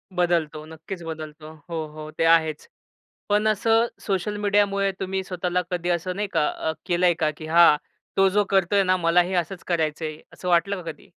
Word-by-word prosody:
बदलतो. 165 -3 0
नक्कीच, 165 +4 -8
बदलतो. 155 -1 -8 0.2
हो, 165 - -4 0.2
हो, 155 0 -7
ते 165 - +2
आहेच. 160 -2 +1 0.6
पण 210 +1 +2
असं 225 +2 +3 0.2
सोशल 205 +1 -1
मीडियामुळे 200 -1 +2
तुम्ही 190 0 -2
स्वतःला 180 -1 -1
कधी 175 0 -2
असं 180 +2 -1
नाही 205 0 -2
का 150 - +2
अ, 160 - -3
केलंय 175 -1 +3
का 155 - +3
की, 155 - -8
हां 165 -2 +6 0.4
तो 195 0 +5
जो 205 - +4
करतोय 195 +1 +3
ना, 185 0 +2
मलाही 175 +2 +2
असंच 175 +1 -2
करायचंय. 155 -2 -1 0.2
असं 180 - -7
वाटलं 180 +2 +2
का 165 - -5
कधी? - - -21
175 Hz, 175 wpm, -24 LUFS, 160-195 Hz, 0.6 s, हां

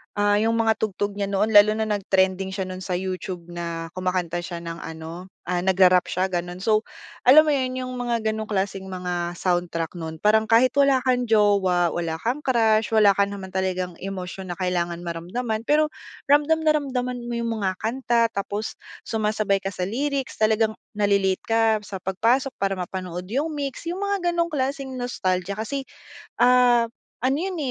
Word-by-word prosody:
Ah, 205 0 +3
yung 225 +2 +2
mga 225 -1 +2
tugtog 205 -1 -2
niya 200 - 0
noon 200 +2 0
lalo 210 0 +7
na 220 0 -2
nag-trending 190 -1 +1
siya 190 -2 -3
nun 185 0 -7
sa 185 - -2
YouTube 185 -1 -4
na 170 -1 -5
kumakanta 180 -2 -1
siya 170 -2 -6
ng 165 0 -6
ano, 160 +2 -8 0.2
ah, 180 - +1
nagra-rap 185 0 +4
siya 185 +1 -1
gano'n. 175 0 -4
So, 215 +1 +2 0.4
alam 280 +5 +9
mo 310 - 0
yun, 255 -2 0
yung 255 - -5
mga 235 -3 -1
gano'ng 215 0 -3
klaseng 195 -2 -2
mga 180 -2 -3
soundtrack 175 -1 -2
nun 160 -1 -6
parang 220 +1 +4
kahit 230 +3 +5
wala 275 -2 +4
kang 250 -1 +1
jowa, 200 -5 +3
wala 165 -1 -3
kang 255 +6 -2
crush, 225 -3 +2
wala 210 -2 +6
ka 200 - +4
naman 200 -2 -7
talagang 185 -2 -2
emosyon 185 -1 -6
na - - -10
kailangan 175 -1 -1
maramdaman, 215 +7 -4
pero 305 +1 +3 0.4
ramdam 295 +2 +4
na 305 -1 +3
ramdam 250 -3 -3
mo 240 - -4
yung 235 0 -2
mga 190 -2 0
kanta 235 0 +1
tapos 205 +1 -4 0.3
sumasabay 215 -2 +1
ka 195 0 -5
sa - - -6
lyrics, 270 +7 -2
talagang 220 0 +2 0.2
nale-late 200 -2 +1
ka 225 -1 +2
sa 195 -1 -7
pagpasok 230 +9 +1
para 195 -1 0
mapanood 180 -1 -5
yung 290 +5 0
MYX, 290 +1 -4
yung 355 - -3
mga 395 -3 0
ganong 340 -2 -1
klaseng 270 -1 -2
nostalgia 195 -6 -2
kasi, 275 +6 -3 0.6
ah, 245 -1 +5 0.4
ano 270 +2 +2
yun, 375 -2 -3
205 Hz, 175 wpm, -24 LUFS, 185-245 Hz, 0.6 s, alam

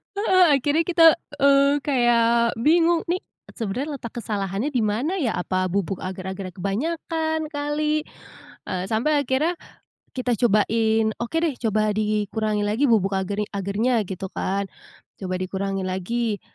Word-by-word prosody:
Heeh, 375 -2 +4 0.2
akhirnya 295 +5 +1
kita, 335 -1 +2 0.4
eee, 280 +1 +4
kayak 235 -4 +2
bingung, 330 +5 +4
nih 355 +2 -1 0.3
sebenarnya 255 +7 -3
letak 240 -2 -7
kesalahannya 200 +2 -2
di 255 -6 0
mana 235 - 0
ya, 270 - 0
apa 185 0 -1
bubuk 195 -1 -2
agar-agarnya 190 0 -5
kebanyakan 315 - -2
kali, 300 +1 -1 0.6
eee, 180 -1 -2
sampai 285 +7 +2
akhirnya, 290 +7 0 0.6
kita 250 -2 -1
cobain, 220 0 +2
oke 235 +7 -4
deh, 325 -4 0
coba 215 -1 +1
dikurangi 215 0 -1
lagi 220 +7 0
bubuk 195 -3 +2
agar 190 +1 -2 0.2
agarnya 215 +5 0
gitu 190 -1 -6
kan. 200 +1 -1 0.5
Coba 185 -1 -3
dikurangi 195 +1 -3
lagi, 205 +4 -2
230 Hz, 130 wpm, -23 LUFS, 200-290 Hz, 0.6 s, Heeh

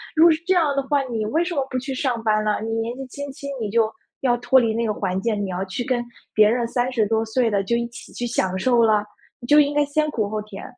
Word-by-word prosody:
如 320 +2 +6
果 335 - +8
是 315 - +2
这 375 - +3
样 310 -6 +2
的 275 - 0
话， 285 0 +1
你 230 -4 -3
为 315 +9 +1
什 345 -2 -4
么 275 -1 0
不 255 - -2
去 270 +1 -5
上 250 -4 -1
班 215 -1 +2
呢？ 210 -1 0
你 225 - -4
年 230 +1 -2
纪 270 - -6
轻 285 +1 -7
轻， 280 0 -8
你 210 - -2
就， 225 0 +2 0.3
要 245 -2 +2
脱 245 +2 +4
离 225 -2 +1
那 230 +1 -1
个 215 - 0
环 185 -1 -2
境， 215 -2 -1
你 - - -5
要 180 +1 -2
去 190 +6 -5
跟 245 -2 0 0.3
别 215 0 +5
人 235 0 0
30 245 -3 0
多 225 +1 +1
岁 230 +1 +1
的 200 -2 0
就 235 +5 0
一 235 0 -2
起 235 - -12
去 240 - -3
享 190 -5 -1
受 240 +1 +3
了？ 210 -2 +3 0.3
你 240 - -10
就 295 - +6
应 290 0 +3
该 295 0 +2
先 305 +1 0
苦 215 -6 -1
后 215 0 -3
甜。” 205 -2 -10
235 Hz, 300 characters per minute, -22 LUFS, 215-270 Hz, 0.3 s, 果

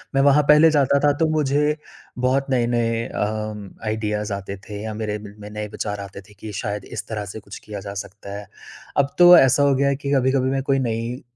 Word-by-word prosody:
मैं 135 - +4
वहाँ 140 +1 +5
पहले 150 +2 +7
जाता 140 -1 +3
था 145 - +5
तो 160 - +2
मुझे 150 +1 +1 0.5
बहुत 135 +2 +1
नए-नए 120 -2 +1
अ, 105 -1 -4
आइडियाज़ 105 -1 -2
आते 100 0 -5
थे 105 0 -6
या 110 -1 -4
मेरे 105 -1 -3 0.2
में 105 0 -9
नए 105 0 -5
विचार 105 -1 -4
आते 100 0 -9
थे 105 - -19
कि 110 +1 -7
शायद 105 -2 -4
इस - - -7
तरह 105 -2 -4
से - - -7
कुछ 100 -1 -11
किया 105 -1 -8
जा 100 - -5
सकता 100 0 -10
है। 105 - -11 0.5
अब 140 0 +1
तो 175 0 +10
ऐसा 135 +1 +5
हो 140 -1 +4
गया 140 +1 +2
है 140 - +1
कि 140 0 -4
कभी-कभी 130 0 +2
मैं 135 - 0
कोई 135 -1 +1
नई 115 +1 -3
115 Hz, 215 wpm, -22 LUFS, 105-135 Hz, 0.5 s, तो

